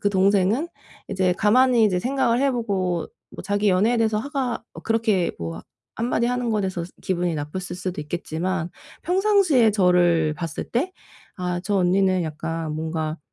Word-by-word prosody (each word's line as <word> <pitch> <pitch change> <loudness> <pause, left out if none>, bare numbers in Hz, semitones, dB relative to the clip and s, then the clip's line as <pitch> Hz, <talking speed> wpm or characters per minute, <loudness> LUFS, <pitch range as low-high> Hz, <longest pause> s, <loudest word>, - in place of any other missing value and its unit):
그 205 - +2
동생은 200 - +2 0.4
이제 185 -2 +1
가만히 235 +4 +4
이제 185 -4 +2
생각을 250 +1 +1
해 275 0 +3
보고 190 -8 -1 0.2
뭐 - - -9
자기 205 +1 +1
연애에 215 +6 +3
대해서 220 -1 +2
화가 260 -2 -3
어 - - -10
그렇게 225 -5 +1
뭐 80 -1 -5 0.3
한마디 235 0 0
하는 245 -1 -1
거에 215 -2 0
대해서 185 -3 -2 0.2
기분이 175 -2 -1
나빴을 150 +5 -4 0.2
수도 180 -3 -4
있겠지만 170 +3 -3 0.3
평상시에 360 - +3
저를 175 -5 +3
봤을 160 +1 -5
때 275 +11 -1 0.5
'아 180 -1 -2
저 205 +1 -1
언니는 185 0 +2
약간 160 0 -4
뭔가 160 0 -3
190 Hz, 330 characters per minute, -23 LUFS, 175-230 Hz, 0.5 s, 가만히